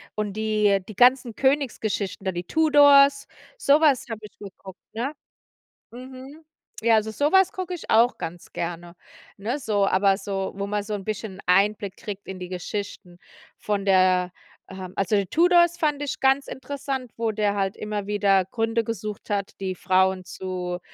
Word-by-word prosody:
und 210 -2 -3
die 215 -2 +1
die 215 - -9
ganzen 245 0 +4
Königsgeschichten, 235 -8 -1
da 190 - 0
die 175 0 -4
Tudors, 285 - +5 0.3
so 295 - +4
was 295 -5 +3
habe 225 -2 -5
ich 210 - -12
geguckt, 190 -1 -12
ne? 245 +6 -3 0.8
Mhm. 260 +5 -11 0.4
Ja, 230 0 +4
also 220 0 -1
so 285 +6 0
was 380 0 +4
gucke 370 -1 -5
ich 340 - -9
auch 235 +3 +4
ganz 175 +1 -8
gerne, 170 0 -5 0.4
ne, 235 +8 -3
so. 205 -4 +1
Aber 195 +1 +3
so, 195 -1 -4
wo 200 0 -3
man 205 0 -2
so 210 +1 -5
'n 200 -2 -5
bisschen 210 -2 -5
Einblick 200 +1 +2
kriegt 205 -1 -8
in 190 -1 -7
die 180 - -6
Geschichten 185 -1 -6 0.4
von 205 -2 -2
der 185 -2 +3 0.4
ähm, 185 -1 -9
also, 200 +1 +1
Tudors 345 - +4
fand 300 -4 0
ich 290 - -4
ganz 270 +1 +3
interessant, 265 -2 -5
wo 225 -1 0
der 205 -1 0
halt 195 -1 -1
immer 210 -1 -4
wieder 200 -2 +2
Gründe 225 +3 -1
gesucht 215 -2 -6
hat, 200 -1 -2
die 190 -1 -3
Frauen 185 0 +1
zu, 180 -2 -5
210 Hz, 165 wpm, -24 LUFS, 190-260 Hz, 0.8 s, Tudors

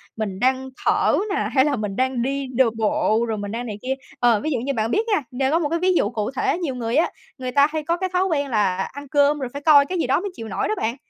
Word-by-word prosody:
mình 200 -3 -4
đang 260 +1 +1 0.2
thở - - +3 0.2
nè, - - -1
hay 265 0 +4
là 290 - +1
mình 210 -4 -4
đang 260 -1 0
đi 275 +2 -2
đ 260 - +4 0.2
bộ 220 +1 +1
rồi 220 -2 -2
mình 205 0 -5
đang 240 +2 -4
này 210 -3 -5
kia. 260 +1 -1 0.3
Ờ, 235 -3 +4
ví 310 - -1
dụ 255 - +1
như 275 +3 -2
bạn 225 -1 -1
biết 445 +3 +1
nha, 410 -7 +2
nên 265 +2 0
có 330 - +3
một 295 - -1
cái 335 +1 0
ví 370 +1 +2
dụ - - +2
cụ 220 0 -3
thể, 270 - 0
nhiều 310 -8 -3
người 235 0 -2
á, 320 - +3 0.3
người 255 -1 -4
ta 280 +2 +5
hay 310 0 -3
có 335 +3 0
cái 375 +1 -2
thói 365 +1 +2
quen 290 -6 -1
là 205 -6 +1 0.2
ăn 285 0 -9
cơm 290 +2 +3
rồi 260 -3 -3
phải 285 - -6
coi 285 -2 +6
cái 365 +4 -3
gì 285 - 0
đó 260 - +2
mới 400 +2 -4
chịu 225 -10 -8
nổi 200 - -2
đó 215 - 0
bạn. 230 +3 -1
265 Hz, 295 wpm, -22 LUFS, 230-300 Hz, 0.3 s, coi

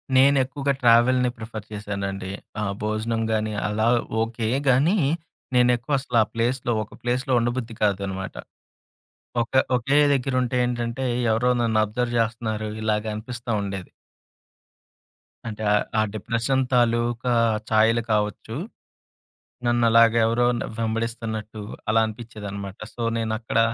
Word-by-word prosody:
నేనెక్కువగా 140 +1 +3
ట్రావెల్‌ని 125 +1 +5
ప్రిఫర్ 110 -2 -7
చేశానండి. 100 -2 -4 0.3
ఆ - - 0 0.2
భోజనం 110 +2 -1
గాని, 110 0 0
అలా 110 +2 0 0.3
ఓకే 115 0 -2 0.2
గాని, 145 +11 +4 0.6
నేను 125 0 +5
ఎక్కువసల 130 0 -2
ఆ - - -6
ప్లే‌స్‌లో 120 +2 0
ఒక 105 - -14
ప్లేస్‌లో 125 +2 0
ఉండబుద్ధి 120 0 -2
కాదన్నమాట. 95 -2 -1 1.1
ఒక 115 - -8 0.2
ఒకే 135 +4 +2 0.2
దగ్గరుంటే 130 -1 0
ఏంటంటే, 120 +1 -2 0.3
ఎవరో 125 +3 +2
నన్ను 110 -2 +2
అబ్జర్వ్ 120 +3 -2
జేస్తున్నారు 110 -1 -1
ఇలాగ 105 0 0
అనిపిస్తా 120 +2 -6
ఉండేది. 100 -2 -5 1.6
అంటే 110 -1 -5
ఆహ్, 105 - +3 0.2
ఆ - - +5
డిప్రెషన్ 115 +5 0
తాలూకా 120 0 +2 0.4
ఛాయలు 110 +2 +4
కావచ్చు. 105 +2 -2 1.1
నన్నలాగా 115 -1 +4
ఎవరో 120 +2 +2 0.3
వెంబడిస్తున్నట్టు 115 -1 -3 0.3
అలా 110 +1 +4
అనిపిచ్చేదనమాట. 105 -3 -7 0.2
సొ, 120 - -4
నేనక్కడ 110 0 -1
115 Hz, 110 wpm, -24 LUFS, 110-120 Hz, 1.6 s, ట్రావెల్‌ని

